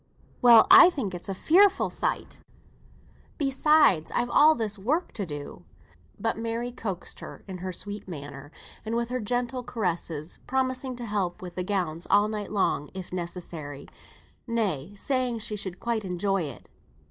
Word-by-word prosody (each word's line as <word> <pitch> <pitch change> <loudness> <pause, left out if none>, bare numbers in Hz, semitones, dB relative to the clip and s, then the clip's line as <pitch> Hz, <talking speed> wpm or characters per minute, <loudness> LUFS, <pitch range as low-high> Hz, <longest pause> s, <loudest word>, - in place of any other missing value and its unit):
"Well, 235 -2 +8
I - - +11
think 245 - -4
it's 175 +2 -6
a 195 - -2
fearful 385 - +4
sight. - - -3 1.0
Besides 280 - +3
I've 240 0 0
all 310 +1 +6
this 215 -3 -3
work 300 - 0
to 200 -5 -4
do." 145 -2 -7 0.6
But 225 -1 -1
Mary 230 +2 -3
coaxed 195 -7 -6 0.3
in 185 -2 -7
her 185 +1 -4
sweet 205 +3 -4
manner, 145 -3 -8 0.3
and 220 +1 -3
with 235 0 -1
her 255 0 -2
gentle 245 +3 -1
caresses, 170 -8 -3
promising 260 0 -1
to 240 0 -6
help 195 -5 -2
with 180 -1 -7
the 180 - -3
gowns 180 -4 -2
all 205 +1 +4
night 210 -2 -4
long 190 -7 0
if 185 -1 -7
necessary, 170 -5 -6 0.6
nay, 205 - -2
saying 255 +2 -1
she 215 -1 -4
should 190 -3 -5
quite 235 -2 -1
enjoy 190 0 -1
it. 140 -4 -9
205 Hz, 155 wpm, -27 LUFS, 180-245 Hz, 1.0 s, I